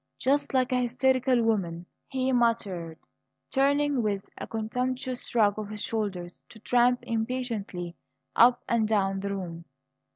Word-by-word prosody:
"Just 280 +2 +1
like 255 -1 +2
a 250 0 +2
hysterical 255 0 +2
woman," 180 -6 0 0.2
he 260 -1 -1
muttered, 205 -9 0 0.5
turning, 285 0 +2
with 200 -3 -2
a - - -7
contemptuous 250 +3 -3
shrug 215 -3 +2
of 210 -1 -5
his 210 -1 -5
shoulders, 190 -6 -3
to - - -13
tramp 245 +2 +3
impatiently 225 -7 -3 0.4
up 245 +1 +5
and 230 -2 +2
down 195 -3 +1
the 200 +1 -3
room. 170 -3 -6
230 Hz, 135 wpm, -28 LUFS, 200-255 Hz, 0.5 s, up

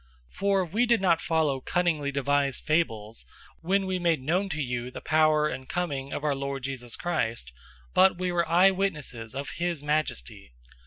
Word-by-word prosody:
001:016 - - -21
For 195 -1 +2
we 215 +9 +1
did 235 0 +4
not 175 -4 +2
follow 155 -5 +1
cunningly 160 -3 0
devised 140 -1 0
fables, 115 -9 -1 0.4
when 190 +3 +1
we 185 -1 -1
made 170 -3 +2
known 175 +9 0
to 155 -3 -3
you 125 -3 -2
the - - -8
power 155 0 +3
and 130 -3 -6
coming 140 -6 -3
of 145 - -4
our 150 -2 +2
Lord 140 -1 -4
Jesus 125 -3 -4
Christ, 115 - -2 0.4
but 190 -1 +5
we 180 0 -1
were 170 -1 0
eyewitnesses 170 - +1
of 140 +1 -4
his 170 -4 -1
majesty. 150 - -2
155 Hz, 170 wpm, -27 LUFS, 135-175 Hz, 0.4 s, but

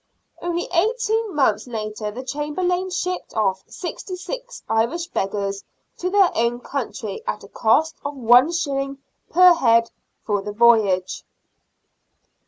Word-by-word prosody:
Only 345 0 -2
eighteen 445 +2 +1
months 220 -6 +2
later 215 -2 -4
the 240 +5 -7
Chamberlain 355 +7 -2
shipped 360 0 -3
off 195 -3 0
sixty 365 +1 -6
six - - -7
Irish 235 +10 0
beggars 195 0 -2 0.4
to 365 - -1
their 390 -2 +4
own 235 +1 +1
country 450 - -5
at - - -3
a - - -11
cost 320 -10 +2
of 285 0 -4
one 250 +4 +5
shilling 275 -5 -2 0.3
per 360 +1 +7
head 230 -7 +3 0.3
for 205 -2 0
the 205 +1 -6
voyage. 210 -5 +3
275 Hz, 130 wpm, -22 LUFS, 220-360 Hz, 0.4 s, per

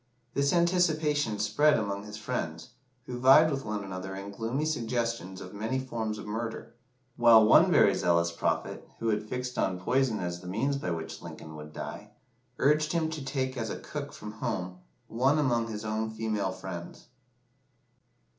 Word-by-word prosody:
This 140 +1 +2
anticipation 155 - +2
spread 110 +9 +3
among 100 -2 -3
his 105 0 -8
friends, 105 -5 -4 0.4
who 125 -1 -5
vied 145 +5 +7
with 135 -1 -2
one 105 -1 -3
another 95 0 -6
in 100 +1 -6
gloomy 115 +8 -2
suggestions 115 - -2
of 90 - -9
many 110 +5 -2
forms 115 -5 -3
of 105 - -8
murder 115 +2 -5 0.4
while 115 -2 +7
one 110 - +7
very - - +5
zealous 85 -1 +2
prophet, 85 - -2
who 115 - -1
had 105 0 -1
fixed 125 0 -3
on 90 -1 0
poison 125 +3 +1
as 90 -1 -4
the 90 - -10
means 120 +10 0
by 140 - -3
which 80 -1 -4
Lincoln 80 -1 -9
would 75 0 -9
die, 105 +6 -7 0.5
urged 150 +3 +3
him 160 -2 0
to 155 -3 -5
take 130 -1 -2
as 115 -3 -3
a - - -4
cook 145 -1 -6
from 105 - -8
home 90 -4 -4 0.3
"one 130 +6 +2
among 120 -6 +1
his 110 -1 -5
own 110 +1 -1
female 110 -3 -2
friends." 95 -2 -8
110 Hz, 170 wpm, -29 LUFS, 95-130 Hz, 0.5 s, vied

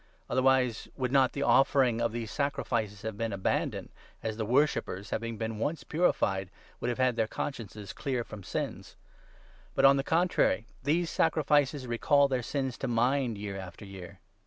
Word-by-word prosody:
Otherwise, 130 -2 +2
2 - - -20
would 125 -2 -1
not 135 -2 +4
the 140 - -2
offering 135 -4 +4
of 115 -1 +1
these 115 -1 -4
sacrifices 115 -7 -2
have 110 -1 -4
been 115 -1 -1
abandoned, 95 -1 -1 0.3
as 110 -1 -2
the 110 -1 -3
worshippers, 120 -6 +1
having 115 0 -3
been 110 -1 -3
once 155 +8 -2
purified, 95 - +1 0.3
would 125 - -1
have 120 - -2
had 130 -2 +2
their 110 -2 +1
consciences 110 -6 -5
clear 130 -4 -2
from 110 -2 -10
sins? 90 - -5 0.8
But, - - +4
on 135 0 +7
the - - +2
3 - - -22
contrary, 165 -8 +2 0.2
these 160 +5 +1
sacrifices 145 -3 +2
recall 140 +4 +3
their 130 -2 0
sins 130 +1 -3
to 135 - -2
mind 120 0 +1
year 100 -1 -5
after 95 +3 -9
year. 95 -1 -10
120 Hz, 175 wpm, -30 LUFS, 110-140 Hz, 0.8 s, on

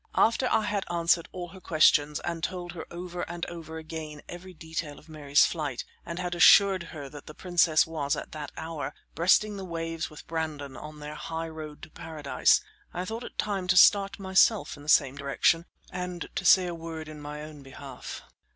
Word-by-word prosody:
After 230 +3 +3
I 220 - +2
had 205 -1 -1
answered 170 0 +2
all 175 -1 -6
her 190 +2 -13
questions, 150 -2 +4
and 170 -1 -4
had - - +1
told 175 -1 -6
her 170 -2 -8
over 175 0 -6
and 170 0 -4
over 160 -2 -8
again 155 -2 -7
every 175 +2 -9
detail 160 -3 -6
of 155 - -17
Mary's 145 -2 +3
flight, 150 -7 -3 0.2
and 170 - -6
had 180 0 -2
assured 190 +2 +7
her 145 -3 -7
that 145 0 -11
the 155 - -10
princess 175 -3 +3
was, 150 -3 -1
at - - -7
that 150 -2 -6
hour, 155 -3 -5 0.2
breasting 200 +5 +3
the 195 - -6
waves 165 -2 -4
with 155 - -12
Brandon, 155 -4 -4
on 150 +1 -9
their 150 +1 -6
high 160 +2 -5
road 155 -2 -9
to 160 - -10
paradise, 155 - +1 0.3
I 180 - -4
thought 225 +4 -5
it - - -10
time 195 -3 -1
to 180 0 +3
start 200 +1 +6
myself 195 +3 +3
in - - -13
the 145 - -8
same 140 -2 +4
direction 145 +4 +2 0.2
and 180 -1 -5
to - - -3
say 185 -1 +7
a 175 - -3
word 165 -1 -7
in 155 -1 -9
my 150 +1 -6
own 155 -1 -10
behalf. 135 -1 -9
165 Hz, 200 wpm, -28 LUFS, 150-180 Hz, 0.3 s, assured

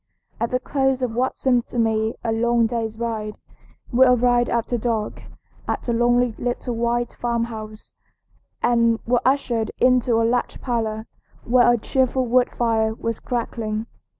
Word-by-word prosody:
At 230 - 0
the 250 - 0
close 265 -1 0
of 240 -3 -1
what 255 +3 -1
seemed 250 -3 +1
to - - -7
me 220 -1 +1
a 230 - -1
long 235 +1 +2
day's 225 -1 -3
ride 220 -2 -3 0.6
we 255 +1 +5
arrived 245 -1 +3
after 235 +1 -1
dark 225 -2 -2 0.5
at - - -3
a 235 - +1
lonely 240 0 +2
little 245 0 -2
white 235 +1 -1
farmhouse, 230 -2 -4 0.7
and 230 -1 +3
were 240 0 +2
ushered 245 -5 +1
into 250 -2 +3
a 230 - +2
large 245 +2 -1
parlor 220 -3 -2 0.4
where 245 0 +4
a 240 - +3
cheerful 260 +2 0
wood 250 +1 +3
fire 220 -2 0
was 230 0 -4
crackling. 225 -2 -3
235 Hz, 150 wpm, -22 LUFS, 225-245 Hz, 0.7 s, we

